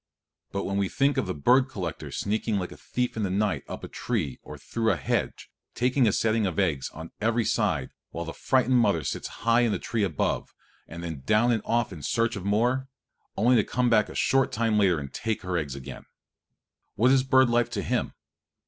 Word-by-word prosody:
But 100 - -2
when 100 +1 -2
we 100 -1 +1
think 140 +1 +1
of - - 0
the 90 - -1
bird 125 - +4
egg - - -22
collector 90 - -5
sneaking 105 +1 -1
like 90 -2 -3
a - - -9
thief 125 0 -3
in 110 - -2
the 100 - 0
night 100 +2 0
up - - -7
a - - -5
tree 65 - -3
or - - -10
through 115 -1 -1
a - - +1
hedge, - - -2 0.2
taking 125 0 +2
a - - +4
setting 110 0 +1
of 90 - -4
eggs 80 -9 0
on 80 +1 -10
every 115 +1 +1
side - - 0 0.2
while 85 - -5
the 80 - -6
frightened 130 -1 +2
mother 100 -9 +2
sits - - -3 0.2
high 115 0 +5
in 120 -2 +2
the 100 - 0
tree 110 +3 -2
above, 85 -7 -1 0.3
and 85 +1 -8
then 80 -5 -5
down 110 - +3
and 115 -3 +1
off 120 -3 0
in 80 - -9
search 115 - 0
of 95 - -6
more, 120 +6 +1 0.5
only 120 +5 +4
to 110 - +4
come 125 +2 0
back 105 -2 +4
in - - -9
a - - -15
short 135 0 +2
time 110 -1 +1
to 90 -8 +2
take 110 -3 -3
her 90 -1 -2
eggs 75 -5 -2
again 70 0 -9 0.9
what 125 +4 +4
is 135 -1 +5
bird 130 0 +4
life 120 0 +2
to - - -3
him? - - -1
110 Hz, 220 wpm, -26 LUFS, 90-120 Hz, 0.9 s, high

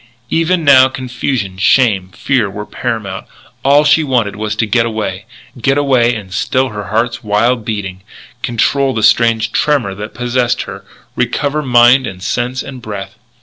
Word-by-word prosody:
Even 165 +1 +1
now 130 -3 +7
confusion, 125 -6 -4
shame, 100 -2 +3
fear 120 +1 -1
were 105 +2 -7
paramount. 100 -5 -4 0.4
All 140 +2 +5
she 150 +2 +4
wanted 125 -8 0
was 105 +1 -3
to 110 - 0
get 115 +2 +2
away, 110 -3 -4 0.4
get 135 +4 +2
away 125 -4 +2
and 100 -4 -8
still 130 +6 0
her 105 -2 -6
heart's 115 +4 -1
wild 115 +3 +1
beating, 100 -4 -4 0.4
control 135 +3 0
the 110 - -1
strange 115 -1 +3
tremor 135 -10 0
that 105 +3 -8
possessed 125 0 0
her, - - -9 0.3
recover 145 +1 -1
mind 125 0 +4
and 90 -1 -8
sense 125 +5 -2
and 130 -2 -9
breath. 100 -2 -7
120 Hz, 155 wpm, -14 LUFS, 105-130 Hz, 0.4 s, now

